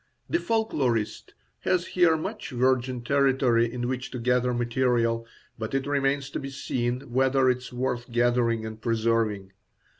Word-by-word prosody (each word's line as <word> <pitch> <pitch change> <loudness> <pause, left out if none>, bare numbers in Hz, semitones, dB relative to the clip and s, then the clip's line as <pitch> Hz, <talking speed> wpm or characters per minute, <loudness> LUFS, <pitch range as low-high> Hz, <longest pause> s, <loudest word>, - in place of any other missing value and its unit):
The 340 - +1
folklorist 135 - -1 0.2
has 180 -1 +1
here 175 -3 +3
much 210 +7 -5
virgin 130 0 +1
territory 130 -3 +2
in 120 0 -3
which 130 +1 -3
to - - -6
gather 125 +1 +1
material, 120 -1 +1 0.3
but 110 +4 -3
it 135 -1 0
remains 140 -1 0
to - - -3
be 135 - -6
seen 125 -2 -2
whether 130 +1 +2
it 125 - -2
is 125 - -10
worth 125 -1 -3
gathering 120 -1 +2
and 110 0 -7
preserving. 110 -4 0
125 Hz, 150 wpm, -26 LUFS, 115-135 Hz, 0.3 s, here